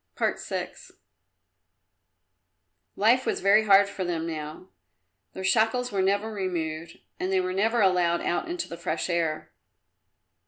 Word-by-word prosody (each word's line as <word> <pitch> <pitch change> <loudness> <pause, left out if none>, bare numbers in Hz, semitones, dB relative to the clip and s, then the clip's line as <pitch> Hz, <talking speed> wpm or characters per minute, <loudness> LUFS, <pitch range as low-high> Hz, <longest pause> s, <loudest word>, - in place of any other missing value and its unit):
VI - - -2 2.2
Life 235 +5 +3
was - - 0
very 210 +3 +4
hard 200 -1 +6
for 200 -1 -5
them 170 -2 -2
now. 155 +2 -6 0.6
Their 190 - -7
shackles 225 +5 +2
were 195 - 0
never 200 +3 0
removed, 170 -4 -4 0.2
and 185 - -2
they 190 - +3
were 185 0 -2
never 225 +4 +1
allowed 180 -3 +2
out 175 - -2
into 350 0 -3
the 170 - -8
fresh 160 +3 -3
air. 165 -2 -2
190 Hz, 130 wpm, -26 LUFS, 170-210 Hz, 2.2 s, hard